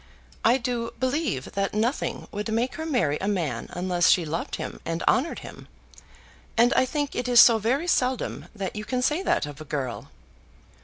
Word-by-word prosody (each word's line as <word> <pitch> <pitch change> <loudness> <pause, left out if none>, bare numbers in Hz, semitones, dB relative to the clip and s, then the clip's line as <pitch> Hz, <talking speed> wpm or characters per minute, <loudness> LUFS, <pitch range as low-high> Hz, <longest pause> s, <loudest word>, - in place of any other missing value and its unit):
I 240 +3 +5
do 240 -2 -3
believe 260 - -1
that 195 +1 -2
nothing 235 +6 -1
would 210 +2 -4
make 235 +3 0
her 320 0 -5
marry 195 - +1
a 195 - -1
man 160 - -1
unless 175 -1 +1
she 175 - +4
loved 160 +3 -3
him - - -6
and 165 0 -3
honoured 270 +6 +2
him, - - -11 0.9
and 240 +3 +5
I 260 - +3
think 290 +1 -2
it 250 - -2
is 245 -1 +6
so 230 -2 +8
very 255 +9 0
seldom 260 -7 0
that 195 -1 -4
you 210 - -4
can 250 +3 -2
say 305 +7 +1
that 385 - +1
of 145 +1 -9
a - - -5
girl." 135 -5 -4
230 Hz, 190 wpm, -25 LUFS, 175-255 Hz, 0.9 s, so